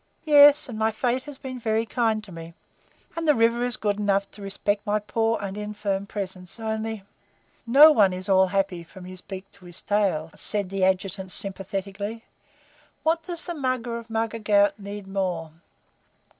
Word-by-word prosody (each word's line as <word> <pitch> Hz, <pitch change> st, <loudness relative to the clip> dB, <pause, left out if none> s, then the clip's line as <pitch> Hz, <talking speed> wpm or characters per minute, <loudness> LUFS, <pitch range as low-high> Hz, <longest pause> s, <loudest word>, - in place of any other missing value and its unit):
Yes, 290 Hz, 0 st, +7 dB
and 225 Hz, -4 st, -6 dB
my 220 Hz, 0 st, +3 dB
Fate 245 Hz, +3 st, -1 dB
has 285 Hz, -, -10 dB
been 260 Hz, -2 st, -7 dB
very 225 Hz, -1 st, 0 dB
kind 225 Hz, -2 st, 0 dB
to 205 Hz, -, -12 dB
me, 165 Hz, 0 st, -10 dB, 0.6 s
and 330 Hz, -1 st, -3 dB
the 300 Hz, -, +5 dB
river 230 Hz, +1 st, +3 dB
is 245 Hz, 0 st, -1 dB
good 205 Hz, -1 st, -1 dB
enough 200 Hz, -1 st, +1 dB
to 210 Hz, -, -13 dB
respect 200 Hz, +1 st, -2 dB
my 210 Hz, +1 st, +1 dB
poor 225 Hz, +2 st, 0 dB
and 195 Hz, -1 st, -5 dB
infirm 205 Hz, -1 st, -3 dB
presence; 185 Hz, -1 st, -6 dB
only 220 Hz, -1 st, -3 dB, 0.3 s
" -, -, -37 dB
"No 305 Hz, +2 st, +11 dB
one 205 Hz, -9 st, +4 dB
is 185 Hz, +1 st, -6 dB
all 190 Hz, -1 st, +5 dB
happy 190 Hz, -2 st, -1 dB
from 180 Hz, +2 st, -13 dB
his 185 Hz, 0 st, -9 dB
beak 190 Hz, -1 st, -8 dB
to 190 Hz, -2 st, -18 dB
his 175 Hz, 0 st, -9 dB
tail," 185 Hz, -6 st, 0 dB
said 205 Hz, -3 st, -1 dB
the 195 Hz, -1 st, -1 dB
Adjutant 190 Hz, 0 st, 0 dB
sympathetically. 195 Hz, +3 st, -4 dB, 0.8 s
"What 325 Hz, +1 st, +2 dB
does 340 Hz, 0 st, -4 dB
the 345 Hz, -, -4 dB
Mugger 255 Hz, -5 st, -2 dB
of 230 Hz, 0 st, -13 dB
Mugger 225 Hz, 0 st, -2 dB
Ghaut 205 Hz, -1 st, +3 dB
need 200 Hz, 0 st, -7 dB
more?" 180 Hz, -5 st, -2 dB
205 Hz, 180 wpm, -25 LUFS, 195-230 Hz, 0.8 s, No